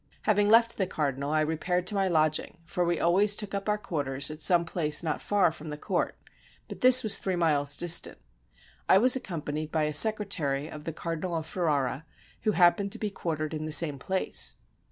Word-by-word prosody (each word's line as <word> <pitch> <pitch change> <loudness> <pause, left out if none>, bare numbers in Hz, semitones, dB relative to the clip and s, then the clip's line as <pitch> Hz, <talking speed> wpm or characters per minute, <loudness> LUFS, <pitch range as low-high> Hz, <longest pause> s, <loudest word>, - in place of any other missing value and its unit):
Having 205 -1 +1
left 230 +1 +3
the 190 - -1
cardinal, 140 -4 -3
I 155 0 +1
repaired 175 +3 -2
to 195 - -2
my 195 -1 0
lodging, 155 -1 -1
for 175 +2 -3
we 170 -1 -1
always 200 +4 +3
took 205 -2 -6
up 200 +1 -4
our 210 - 0
quarters 145 -8 +2
at 155 +1 -10
some 175 0 +3
place 160 -1 0
not 155 -3 -3
far 205 -5 +1
from 160 -1 -11
the 150 - -7
court, - - -3 0.5
but - - -11
this 255 0 +6
was 220 - +5
three 190 -1 -3
miles 145 -4 0
distant. 175 -1 +2 0.7
I 190 - +6
was 250 +5 +5
accompanied 155 - -6
by 160 -1 -1
a 150 0 -2
secretary 155 -7 +1
of 150 -1 -11
the 165 - -4
Cardinal 165 +2 -5
of 160 -1 -4
Ferrara, 150 -4 -3 0.3
who 215 - -1
happened 195 +3 +2
to - - -7
be 210 -2 -4
quartered 155 -4 -5
in 155 0 -5
the 155 - -6
same 150 -2 +4
place. 190 +7 0
170 Hz, 200 wpm, -27 LUFS, 155-195 Hz, 0.7 s, this